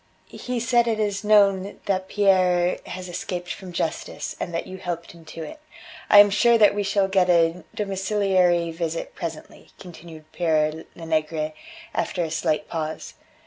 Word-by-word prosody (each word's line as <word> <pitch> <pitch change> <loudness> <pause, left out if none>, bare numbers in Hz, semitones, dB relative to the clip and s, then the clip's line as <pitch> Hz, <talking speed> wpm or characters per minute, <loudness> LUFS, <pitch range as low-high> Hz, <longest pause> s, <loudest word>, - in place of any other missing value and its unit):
He 250 -1 -5
said 235 0 +2
it 220 -1 0
is 205 -2 -1
known 200 -2 +3
that 190 -1 -1
Pierre 185 -3 +2
has 185 0 -7
escaped 175 0 -5
from 185 -1 -10
justice, 165 -2 -4
and - - -4
that 165 - -3
you 190 - -8
helped 170 -1 -5
him 170 -1 -16
to 160 +1 -8
it. 310 - -9 0.5
"I 205 - +7
am 205 0 +8
sure 235 +3 +4
that 210 -2 +5
we 205 - -1
shall 200 0 +1
get 190 -2 +2
a 170 0 +3
domiciliary 190 -4 +1
visit 165 0 -4
presently," 165 -4 -8
continued 165 -3 -12
Pere 160 -2 0
Lenegre, 155 -1 -2 0.4
after 180 - -1
a 160 - -4
slight 155 -1 -1
pause. 160 -1 -5
180 Hz, 160 wpm, -24 LUFS, 165-200 Hz, 0.5 s, am